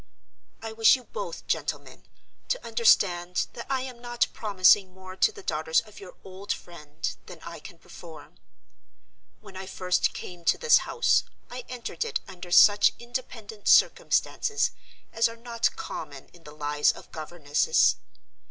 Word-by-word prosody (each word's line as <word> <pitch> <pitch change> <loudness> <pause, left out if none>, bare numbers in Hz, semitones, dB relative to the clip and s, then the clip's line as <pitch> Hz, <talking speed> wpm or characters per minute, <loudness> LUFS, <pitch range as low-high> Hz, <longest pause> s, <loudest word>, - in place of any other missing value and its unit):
I 225 - -5
wish 220 +2 +5
you 255 - -9
both, - - -7
gentlemen, - - -4 0.4
to - - -2
understand 185 -6 +2
that 235 - -8
I 265 -1 0
am 255 -2 -8
not 240 0 0
promising 190 -2 +3
more 185 0 -11
to 435 - +3
the 415 -2 -13
daughters 160 - +1
of 215 -2 -15
your 190 -2 -12
old 190 +1 -7
friend 155 -3 -6 0.2
than - - -11
I - - -8
can - - -12
perform. - - -14 1.0
When 190 - -14
I 190 0 -7
first 180 -1 0
came 175 -1 -9
to - - +3
this 475 -1 +5
house, 470 - +3 0.3
I 245 0 -7
entered 235 -9 -4
it - - -3
under 180 -2 -10
such 205 +3 +6
independent 230 -3 -7
circumstances 430 -1 +3 0.4
as 230 0 +2
are 230 - -11
not 235 0 -1
common - - -8
in 170 -2 -21
the 150 - -12
lives 150 0 +1
of - - -14
governesses. 155 - +1
205 Hz, 150 wpm, -26 LUFS, 175-240 Hz, 1.0 s, such